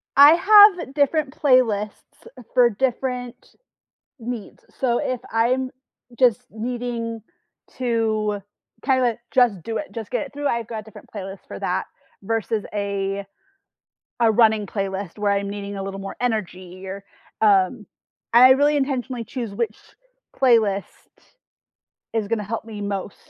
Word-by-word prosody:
I 285 +2 +10
have 395 -6 +6
different 290 -1 +1
playlists, 230 -7 +1
eh, 250 - -11
for 245 -1 +5
different 250 +1 -3 0.6
needs. 235 -2 -7 0.2
So, 240 -2 +1
if 255 -2 -2
I'm 255 +3 +1 0.5
just 245 -5 +3
needing 230 0 -4 0.6
to 220 -4 0 0.4
kind 260 -1 +2
of, 250 - +3
eh, 230 - -1
just 235 -9 +3
do 225 -1 -3
it, 305 - -6
just 225 -3 -7
get 290 - -1
it 275 - -22
through, 290 0 -2
I've 235 -3 -1
got 220 -2 -6
different 220 - -14
playlist 195 -2 -7
for - - -8
that, - - -1 0.4
versus 225 0 -2
a 200 -1 -2 1.0
a 230 -1 +5
running 220 -2 +3
playlist 195 -1 -4
where 205 -1 +1
I'm 200 0 -1
needing 200 0 -6
a 195 - -4
little 195 0 -5
more 195 0 -7
energy 185 -5 -3
or, 195 +1 -7 0.4
um 205 +1 +3 0.5
I 250 +2 +8
really 290 +3 +3
intentionally 260 -4 -2
choose 235 -4 -5
which 220 0 -2 0.6
playlist 220 -7 +3 1.3
is 220 -3 -1
gonna 220 -2 -1
help 225 +3 -4
me 215 -2 -8
most 200 -1 -4
225 Hz, 140 wpm, -22 LUFS, 200-250 Hz, 1.3 s, I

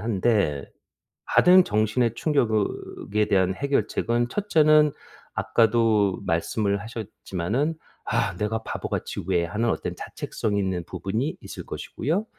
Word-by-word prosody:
한데 100 - 0 0.6
받은 185 +1 +6
정신의 110 +1 +1
충격으 115 -9 +2 0.5
에 105 0 +4
대한 95 -2 +2
해결책은 120 -2 0
첫째는 155 -5 +4 0.4
아까도 110 -4 +2
말씀을 100 +5 0
하셨지만은 110 - -3 0.3
"아 - - 0
내가 110 +2 -1
바보같이 - - -4
왜." 85 -1 +2
하는 110 +7 -1
어떤 - - -2
자책성이 105 -2 -3
있는 95 -3 -1
부분이 95 - -3
있을 - - -8
것이고요. 165 - -2
110 Hz, 280 characters per minute, -25 LUFS, 100-125 Hz, 0.6 s, 받은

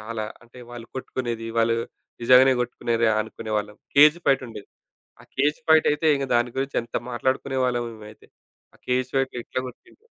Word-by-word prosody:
చాలా. 110 0 -5 0.2
అంటే 120 +1 -17
వాళ్ళు 120 -1 -9
కొట్టుకునేది, 120 -3 -4
వాళ్ళు 115 0 +3 0.5
నిజంగానే 130 +2 +7
కొట్టుకున్నారు 120 -1 -1
అనుకునేవాళ్ళం. 105 -1 -4 0.2
కేజ్ 150 +2 +8
ఫైట్ 135 -1 +3
ఉండేది. 105 -3 -10 0.5
ఆ - - -17
కేజ్ 145 +3 +1
ఫైటయితే 160 -1 +4
ఇంక 140 -1 -2
దాని 120 +1 +2
గురించి 135 +1 -2
ఎంత 120 - -10 0.2
మాట్లాడుకునేవాళ్ళమో 125 -1 -1
మేమైతే! 110 0 -14 0.5
ఆ - - -22
కేజ్ 125 0 0
ఫైట్‌లో 135 -2 0
ఎట్లా 130 - -4
కొట్టిండు. 365 - -16
125 Hz, 145 wpm, -24 LUFS, 115-135 Hz, 0.5 s, కేజ్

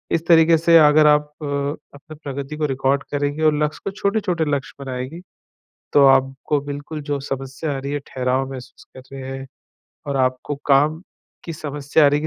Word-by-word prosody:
इस 165 0 -2
तरीक़े 165 -1 +6
से 165 +1 +5
अगर 150 0 +6
आप 150 0 +3
अपनी 145 +1 -5
प्रगति 140 -1 -6
को 155 - 0
रिकॉर्ड 135 +1 0
करेंगे 145 +2 -1
और 155 -1 +5
लक्ष्य 150 0 -3
को 200 - -2
छोटे-छोटे 200 -5 -1
लक्ष्य 140 0 -4
बनाएगी, 130 +6 -6 0.7
तो 145 - +6
आपको 135 +2 +2
बिल्कुल 145 +2 -6
जो 145 -1 -3
समस्या 135 +2 -4
आ - - -3
रही 140 +1 -5
हैं, 145 - -1
ठहराव 130 +1 -1
महसूस 130 -1 -10
कर 130 - -10
रहे 135 -1 -7
हैं 135 0 -6 0.6
और 140 -1 -2
आपको 130 +2 0
काम 150 +3 +3 0.4
की 165 - -5
समस्या 150 -1 0
आ - - +7
रही 145 - +2
हैं 150 - -5
145 Hz, 180 wpm, -21 LUFS, 135-155 Hz, 0.7 s, आ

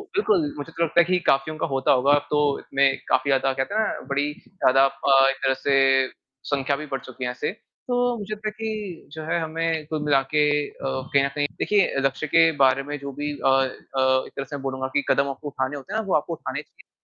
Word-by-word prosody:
बिल्कुल, 375 -7 +2
मुझे 145 +3 -7
तो 165 - -1
लगता 165 +1 +2
है - - +8
कि 180 +1 +2
काफ़ियों 135 +3 0
का - - -1
होता 135 -2 +1
होगा। 135 +2 +3
अब 145 0 -2
तो 150 -1 +1
इसमें 140 0 +1 0.2
काफ़ी 130 +2 +2
ज़्यादा, 135 0 +2
कहते 135 +9 -3
हैं 220 - +3
ना, 220 - -2
बड़ी 145 +1 0 0.2
ज़्यादा 135 -7 +3
अ, 135 0 +4
एक 135 - 0
तरह 135 - +3
से 135 -1 +4 0.5
संख्या 140 0 +1
भी 150 +2 -6
बढ़ 135 - -1
चुकी 130 0 -7
है 125 - -1
ऐसे। 125 - -3 0.4
तो 245 - 0 0.2
मुझे 210 0 -5
लगता 215 0 -5
है 215 - -1
कि 215 -8 -5
जो 155 +1 -7
है, 165 +2 0
हमें 160 0 -2
कुल 155 -1 -3
मिलाके 145 +1 +2 0.3
अ, - - -15
कहीं 135 +1 0
न - - +1
कहीं, 145 -1 +1
देखिए 205 -2 +3
अ, - - -2
लक्ष्य 135 +3 -1
के 165 +1 +5
बारे 135 +1 +4
में, 145 +1 -5
जो 140 0 -6
भी 145 +2 -3
अ - - +5
अ, 135 0 +4 0.6
एक - - -15
तरह 135 - -4
से 145 - -7
मैं 140 - -6
बोलूँगा 130 -1 -3
कि 145 - +2
कदम 140 0 +2
आपको 135 +2 -7
उठाने 135 0 -3
होते 145 +9 -9
हैं 220 - 0
ना, - - -9
वो 185 - +2
आपको 155 +3 0
उठाने 165 - -5
चाहिए, - - -23
145 Hz, 245 wpm, -24 LUFS, 135-165 Hz, 0.6 s, है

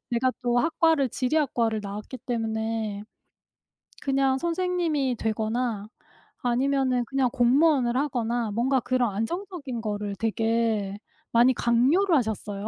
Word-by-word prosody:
제가 250 +2 +2
또 245 0 +2
학과를 320 -1 +2
지리학과를 250 -4 0
나왔기 210 +5 -7
때문에 220 -3 -3 1.0
그냥 270 -1 +1
선생님이 335 -5 0
되거나 220 0 -1 0.6
아니면은 255 0 +1
그냥 270 0 +1
공무원을 255 0 +3
하거나 240 -5 -1
뭔가 255 +5 +1
그런 245 -3 0
안정적인 285 - -4
거를 205 -2 -3
되게 225 -1 0 0.3
많이 240 +2 +5
강요를 275 +13 +3
하셨어요. 215 -5 -2
245 Hz, 285 characters per minute, -26 LUFS, 225-275 Hz, 1.0 s, 많이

